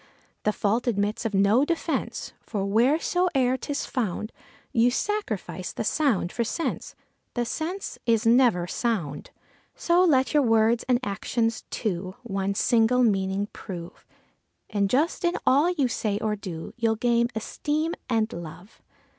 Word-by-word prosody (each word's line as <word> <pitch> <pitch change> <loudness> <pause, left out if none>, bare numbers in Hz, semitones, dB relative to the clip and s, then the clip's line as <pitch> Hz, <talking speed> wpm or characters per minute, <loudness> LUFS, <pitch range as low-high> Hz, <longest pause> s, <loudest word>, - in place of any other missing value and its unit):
The 210 - +4
fault 215 +4 0
admits 210 0 0
of 215 -3 -1
no 200 +7 +4
defence, 330 +1 -2
for 200 -3 -3
wheresoe'er 265 - +2
'tis 285 +3 -3
found, 215 -3 -2 0.4
You 235 +1 +4
sacrifice 415 +11 -3
the - - -4
sound 240 - +1
for 235 - -1
sense; 280 +9 -3 0.4
the 240 -1 0
sense 330 - -4
is 230 0 +3
never 230 -7 +4
sound. 175 - -2 0.5
So 350 +1 +3
let 265 -8 +3
your 300 - +5
words 225 -1 +3
and 245 -1 +4
actions, 225 +3 -1
too, 185 -3 -3
one 195 -3 -2
single 235 +4 +3
meaning 195 -2 +1
prove, 175 -4 -9 0.6
And 200 -2 +1
just 300 - +1
in 345 0 +2
all 290 +6 +4
you 300 -8 +1
say 215 -3 -1
or 215 0 -1
do, 175 -5 -7
you'll 225 -2 +1
gain 235 +1 +2
esteem 300 +8 -2 0.2
and 225 -2 +1
love. 170 +4 -10
230 Hz, 140 wpm, -26 LUFS, 200-265 Hz, 0.6 s, your